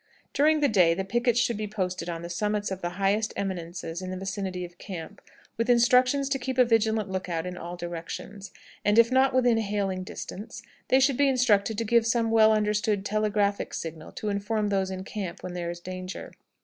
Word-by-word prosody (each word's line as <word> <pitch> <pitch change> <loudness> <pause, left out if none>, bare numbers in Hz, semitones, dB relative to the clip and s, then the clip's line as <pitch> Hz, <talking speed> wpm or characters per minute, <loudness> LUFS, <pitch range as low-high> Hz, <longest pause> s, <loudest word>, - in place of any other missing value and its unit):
During 300 +2 +3
the 290 - +5
day 180 -8 +4
the 190 - -2
pickets 240 +3 +1
should 235 -2 +1
be 215 0 -3
posted 185 -4 -3
on 165 0 -4
the - - -5
summits 210 +2 -1
of 190 0 -4
the 175 +1 -4
highest 200 +2 +1
eminences 175 -2 -4
in 185 - -5
the 185 - -4
vicinity 190 -1 -4
of 175 0 -14
camp, 175 -5 -8 0.4
with 230 +2 -1
instructions 250 +3 +4
to 275 -1 0
keep 260 0 -4
a 250 - +6
vigilant 220 -2 +2
lookout 180 -3 -3
in 180 0 -5
all 175 0 -6
directions; 175 +4 -7 0.3
and, 205 +1 +3
if 230 +1 +6
not 260 +1 +4
within 245 -3 +3
hailing 200 -3 -1
distance, 195 +2 -8 0.2
they 260 - +4
should 270 -1 +3
be 285 -1 +4
instructed 225 -5 +2
to 230 - 0
give 230 +1 +3
some 230 -1 +1
well 220 -1 +6
understood 210 -1 +1
telegraphic 210 -1 0
signals 160 -1 -7
to 215 - -3
inform 205 +1 -1
those 195 -1 0
in 190 0 -5
camp 190 -3 -6
when 180 - -5
there 175 -1 -3
is 175 0 -6
danger. 185 +1 -7
205 Hz, 200 wpm, -27 LUFS, 185-230 Hz, 0.4 s, a